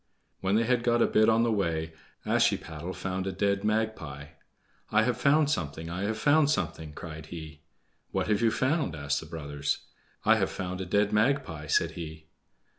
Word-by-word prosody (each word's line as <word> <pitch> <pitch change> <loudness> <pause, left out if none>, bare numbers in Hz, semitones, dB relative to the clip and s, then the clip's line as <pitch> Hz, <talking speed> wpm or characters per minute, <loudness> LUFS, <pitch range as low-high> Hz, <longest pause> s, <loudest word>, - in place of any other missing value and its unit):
When 95 +1 +1
they 115 - +4
had 120 +1 +2
got 120 -1 +3
a - - +5
bit 110 +1 +4
on 115 +1 +4
the 120 - +2
way 80 -6 -1 0.3
Ashiepattle 85 +3 0
found 95 0 -3
a - - -1
dead 100 +1 0
magpie. 105 -10 -2 0.6
"I 110 +1 +4
have 125 +1 +1
found 145 +3 +3
something! 80 - -3
I 90 +3 -2
have 110 +1 -1
found 145 +2 +4
something!" 80 - -2
cried 80 -1 -8
he. 80 -2 -9 0.5
"What - - -1
have 105 0 +1
you 115 - +4
found?" 130 - 0
asked 70 -1 -1
the 80 - -10
brothers. 75 -3 -3 0.4
"I - - +6
have - - +1
found 90 0 -4
a 95 - -5
dead 100 +3 +2
magpie," 105 - +1
said - - +2
he. 80 -2 -8
95 Hz, 185 wpm, -28 LUFS, 80-110 Hz, 0.6 s, I